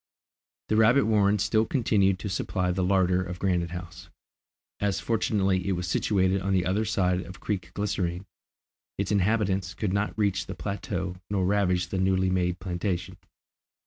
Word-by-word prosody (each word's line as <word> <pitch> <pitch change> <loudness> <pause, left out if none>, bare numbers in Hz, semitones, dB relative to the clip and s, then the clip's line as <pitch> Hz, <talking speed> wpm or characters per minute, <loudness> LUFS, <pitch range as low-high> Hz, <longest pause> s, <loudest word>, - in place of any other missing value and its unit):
The 110 - +2
rabbit 115 +5 +5
warren 105 -2 +3
still 110 +2 +2
continued 100 -7 +2
to 95 - -5
supply 90 -1 -1
the 90 +1 -1
larder 90 -1 +2
of 90 0 -6
Granite 90 -3 0
House. 90 +1 -8 0.7
As 100 -2 0
fortunately 100 -4 0
it 100 - +1
was 90 0 -3
situated 95 +2 +1
on 95 +1 -1
the 90 -1 +2
other 100 +5 +1
side 90 -3 +1
of 90 -1 -10
Creek 90 -5 -3
Glycerine, 95 -3 -2 0.7
its 100 0 -2
inhabitants 100 -2 +1
could 100 -4 -2
not 100 +2 -1
reach 100 -3 0
the 95 - -6
plateau 95 +1 -4
nor 100 -2 0
ravage 90 -3 +1
the 95 - -2
newly 95 0 +2
made 90 -1 0
plantation. 90 -1 -3
95 Hz, 160 wpm, -27 LUFS, 90-100 Hz, 0.7 s, rabbit